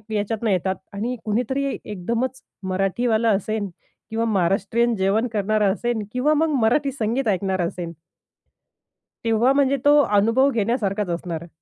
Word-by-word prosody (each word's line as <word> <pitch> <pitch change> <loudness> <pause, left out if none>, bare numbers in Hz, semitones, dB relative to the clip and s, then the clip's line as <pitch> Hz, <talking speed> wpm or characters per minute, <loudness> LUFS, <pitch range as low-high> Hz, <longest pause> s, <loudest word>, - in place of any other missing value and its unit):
याच्यातनं 215 +2 -1
येतात 190 0 +1 0.2
आणि 230 +5 -2
कुणीतरी 245 +6 0 0.2
एकदमच 235 +7 -3 0.3
मराठीवालं 220 +5 +1
असेन 210 0 -3 0.4
किंवा 225 +1 -1
महाराष्ट्रीयन 215 +4 +1
जेवण 200 +5 +1
करणारा 210 0 +1
असेन 235 +1 -2
किंवा 275 +5 +2
मग 315 +1 +2
मराठी 275 +6 +2
संगीत 245 0 -1
ऐकणारा 190 -2 0
असेन. 170 0 -4 1.3
तेव्हा 230 +3 +3
म्हणजे 280 0 +3
तो 295 +1 +6
अनुभव 230 +5 +3
घेण्यासारखाच 210 -4 -1
असणार 170 -1 -3
आहे. 170 - -11
220 Hz, 130 wpm, -22 LUFS, 195-245 Hz, 1.3 s, तो